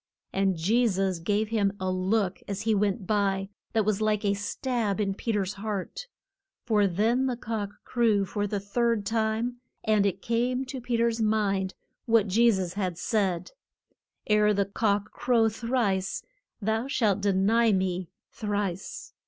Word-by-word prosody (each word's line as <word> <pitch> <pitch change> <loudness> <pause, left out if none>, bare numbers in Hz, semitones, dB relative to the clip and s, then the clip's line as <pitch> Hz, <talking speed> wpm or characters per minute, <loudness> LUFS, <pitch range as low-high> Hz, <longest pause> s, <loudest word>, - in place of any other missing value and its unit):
And 195 -2 +1
Je 225 +9 +3
sus 190 -3 0
gave 205 +5 0
him 205 -3 +1
a 185 0 -1
look 185 +1 0
as 200 0 -3
he 220 0 +2
went 200 0 0
by, 195 -1 0 0.2
that 220 -2 +2
was 215 0 +1
like 215 0 +1
a 200 - +3
stab 215 +1 -2
in 195 -2 0
Pe 225 +4 -3
ter's 200 -2 -1
heart. 210 - -5 0.6
For 210 -4 +3
then 225 +8 +1
the 250 -2 -2
cock 215 -3 -3
crew 220 -5 +2
for 205 +2 -2
the 205 0 -2
third 225 +1 0
time, 225 +2 0 0.3
and 215 -2 +3
it 195 0 -3
came 245 +3 0
to 260 0 -6
Pe 240 -1 -1
ter's 230 0 +1
mind 200 -3 +1 0.3
what 225 -3 +4
Je 230 +5 +4
sus 185 -4 -2
had 185 -4 -2
said, 190 - 0 0.7
Ere 210 0 +3
the 200 0 +2
cock 205 0 0
crow 235 -2 +2
thrice, 220 -4 -1 0.4
thou 220 +3 -1
shalt 210 -7 +1
de 200 0 +2
ny 220 +4 +3
me 185 -2 0 0.2
thrice. 205 -4 -3
210 Hz, 160 wpm, -27 LUFS, 195-225 Hz, 0.7 s, what